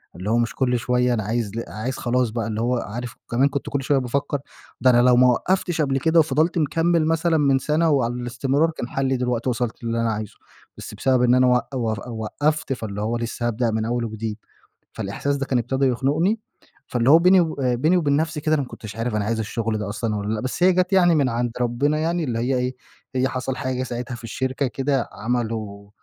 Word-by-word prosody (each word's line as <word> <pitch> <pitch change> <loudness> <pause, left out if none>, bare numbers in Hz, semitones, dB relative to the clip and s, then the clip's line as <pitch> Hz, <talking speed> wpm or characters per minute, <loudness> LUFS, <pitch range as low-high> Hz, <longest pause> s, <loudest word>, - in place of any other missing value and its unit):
اللي 95 +4 -5
هو 115 - +3
مش 120 -1 0
كل 125 -2 +1
شوية 125 +2 +1
أنا 110 -2 -1
عايز 110 0 -2
ل 115 - -2
عايز 125 +5 -4
خلاص 125 0 +1
بقى، 115 -1 -3
اللي 110 0 -2
هو 125 +2 +1
عارف 120 +2 -5
كمان 130 +4 +3
كنت 140 -1 -4
كل 140 -1 -2
شوية 140 +1 +2
بافكر 140 +3 -1 0.4
ده 130 - +5
أنا 120 -1 +5
لو 125 0 +5
ما 125 +1 +6
وقفتش 175 +6 +1
قبل 135 -2 +1
كده 160 +3 +3
وفضلت 160 +2 +2
مكمّل 165 +1 +2
مثلًا 165 +1 +2
من 140 -3 +3
سنة 155 +4 +1
وعلى 125 -5 +2
الاستمرار 130 +6 0
كان 140 -6 -5
حلّي 135 -1 0
دلوقتي 125 0 -1
وصلت 120 -1 -3
للي 115 0 -1
أنا 115 -1 +1
عايزه. 105 -1 -5 0.4
بس - - -8
بسبب 130 -2 +2
إن 125 0 +5
أنا 130 0 +4
وق 125 +2 +1
و 115 -3 0 0.3
وقفت 150 +5 -1
فاللي 105 -4 -5
هو 115 +3 -1
لسه 120 0 -3
هابدأ 120 0 0
من 110 0 -1
أول 120 +1 -1
وجديد. 110 -1 -4 0.6
فالإحساس 140 0 -2
ده 135 - -2
كان 130 -2 +1
ابتدى 130 +3 0
يخنقني، 150 - +1 0.5
فاللي 120 +1 +1
هو 160 +3 +8
بيني 180 +2 +6
وب 160 -4 -2
بيني 130 +8 +2
وبين 145 -5 +2
نفسي 155 0 -1
كده 155 +1 +2
أنا 145 - 0
ما - - -8
كنتش 110 -1 -9
عارف 115 0 -2
أنا 105 -1 0
عايز 115 +1 -1
الشغل 110 0 -2
ده 105 -1 -4
أصلًا 110 +1 -2
والّا 105 +1 -2
لأ. 105 - -2
بس 130 +8 -2
هي 185 0 +6
جت 180 +1 +1
يعني 175 -3 +5
من 140 -4 +2
عند 120 0 -1
ربنا 135 +6 +1
يعني 165 +2 0
اللي 120 -6 -2
هي 125 +3 0
إيه، 125 +1 -2 0.4
هي 130 +1 +2
حصل 130 0 -3
حاجة 130 -1 -2
ساعتها 120 -1 -5
في 120 - -12
الشركة 130 +4 -2
كده 135 -1 -1
عملوا 110 -3 -3
125 Hz, 225 wpm, -23 LUFS, 115-145 Hz, 0.6 s, هو